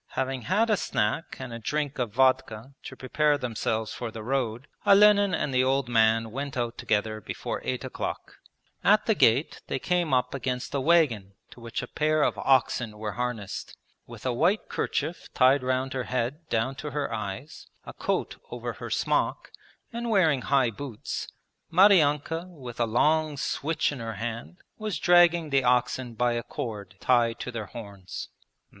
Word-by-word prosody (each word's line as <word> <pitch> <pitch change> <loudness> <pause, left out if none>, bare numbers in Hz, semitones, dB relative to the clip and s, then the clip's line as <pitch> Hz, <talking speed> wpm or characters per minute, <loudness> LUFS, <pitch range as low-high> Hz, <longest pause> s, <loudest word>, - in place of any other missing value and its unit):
Having 130 -1 -2
had 220 +4 +3
a 210 - +3
snack 105 +5 -1
and 130 -3 -7
a 115 - -6
drink 145 +4 -2
of 120 -4 -1
vodka 130 0 +1
to 130 - -7
prepare 145 +3 +1
themselves 115 -3 -2
for 120 - -5
the 110 -1 -8
road, 125 0 -2 0.2
Olenin 205 -1 +6
and 135 - -2
the 130 0 +3
old 135 0 +1
man 115 -1 +3
went 135 +2 -4
out 120 -1 -1
together 110 -2 -1
before - - -5
eight - - -2
o'clock. - - -5 0.5
At 210 +3 +4
the 220 - +3
gate 135 - +2
they - - -1
came 175 +2 0
up 125 -1 +1
against 130 -2 -3
a 140 - 0
wagon 130 - +2 0.2
to - - -14
which 115 +1 -4
a - - -6
pair 155 +2 +1
of - - 0
oxen 120 -4 +2
were 105 0 -4
harnessed. 115 -4 -4 0.3
With 115 -1 -11
a 130 - +1
white 175 - +1
kerchief 160 -2 -3
tied 130 +2 +5
round 130 +1 -1
her 130 -2 -2
head 130 +6 -3
down 115 +4 0
to 150 +4 -5
her 145 -5 -3
eyes, 110 - -6 0.2
a - - -8
coat - - -2
over - - -5
her - - -8
smock, - - 0 0.4
and 235 0 -3
wearing 165 - +3
high 135 -4 +2
boots, 120 -1 -6 0.4
Maryanka 165 -3 +4
with 130 -9 -10
a 120 - +3
long 150 +6 +2
switch 155 +3 -1
in 140 - -6
her 115 -2 -5
hand 115 - -5 0.2
was 215 -2 -2
dragging 175 -3 +4
the 135 -1 +3
oxen 125 0 +1
by 120 +1 +2
a 120 0 -1
cord 105 -4 -6
tied 120 -2 +2
to 125 - -4
their 110 -4 -5
horns. 100 -5 -8
130 Hz, 175 wpm, -27 LUFS, 115-150 Hz, 0.5 s, Olenin